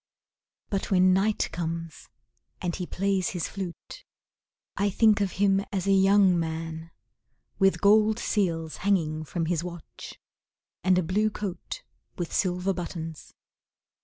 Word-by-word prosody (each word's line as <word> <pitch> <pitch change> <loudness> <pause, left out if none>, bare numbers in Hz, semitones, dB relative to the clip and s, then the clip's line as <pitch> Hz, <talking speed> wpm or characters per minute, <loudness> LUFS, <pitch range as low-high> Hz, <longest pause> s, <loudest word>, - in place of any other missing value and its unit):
But 195 -2 -1
when 185 -1 +5
night 205 +3 +1
comes 165 -1 -5 0.5
and 175 -2 -2
he 180 - -4
plays 195 -1 0
his 170 - -2
flute, 190 -4 -7 0.7
I 200 +1 +1
think 210 +1 +4
of 195 -3 0
him 195 0 +2
as 190 -2 -2
a 200 - +2
young 195 -2 +5
man, 160 0 -4 0.7
With 195 -1 +3
gold 215 +1 +5
seals 165 -9 -1
hanging 165 -6 0
from 165 +1 -2
his 170 0 -1
watch, 175 -3 -9 0.7
And 185 0 +4
a 180 - +2
blue 205 +6 +1
coat 210 - -6 0.3
with 175 -2 -4
silver 180 0 +1
buttons. 165 -3 -7
185 Hz, 135 wpm, -27 LUFS, 170-200 Hz, 0.7 s, when